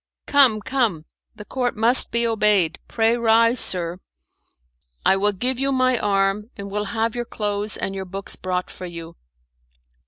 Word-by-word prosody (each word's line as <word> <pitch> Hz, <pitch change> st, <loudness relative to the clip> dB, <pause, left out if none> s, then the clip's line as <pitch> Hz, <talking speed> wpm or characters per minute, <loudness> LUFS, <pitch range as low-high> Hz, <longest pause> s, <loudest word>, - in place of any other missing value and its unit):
Come, 260 Hz, -7 st, +4 dB
come, 225 Hz, -, -1 dB, 0.3 s
the 210 Hz, -, -11 dB
Court 245 Hz, -1 st, -3 dB
must 235 Hz, +4 st, +5 dB
be 235 Hz, 0 st, +1 dB
obeyed, 210 Hz, -7 st, +1 dB
pray 225 Hz, 0 st, +1 dB
rise, 230 Hz, +1 st, +3 dB
sir. 175 Hz, -1 st, 0 dB, 1.1 s
I -, -, +5 dB
will 205 Hz, +2 st, +1 dB
give 245 Hz, +6 st, -1 dB
you 275 Hz, +1 st, 0 dB
my 255 Hz, -2 st, +2 dB
arm, 200 Hz, +1 st, 0 dB
and 200 Hz, -1 st, -7 dB
will 210 Hz, +1 st, -2 dB
have 225 Hz, +1 st, -2 dB
your 240 Hz, -, -3 dB
clothes 210 Hz, -1 st, -2 dB
and 195 Hz, -, -4 dB
your 190 Hz, -1 st, -5 dB
books 195 Hz, +2 st, -3 dB
brought 180 Hz, -1 st, -4 dB
for 185 Hz, -, -8 dB
you." 170 Hz, -1 st, -9 dB
210 Hz, 160 wpm, -22 LUFS, 195-235 Hz, 1.1 s, must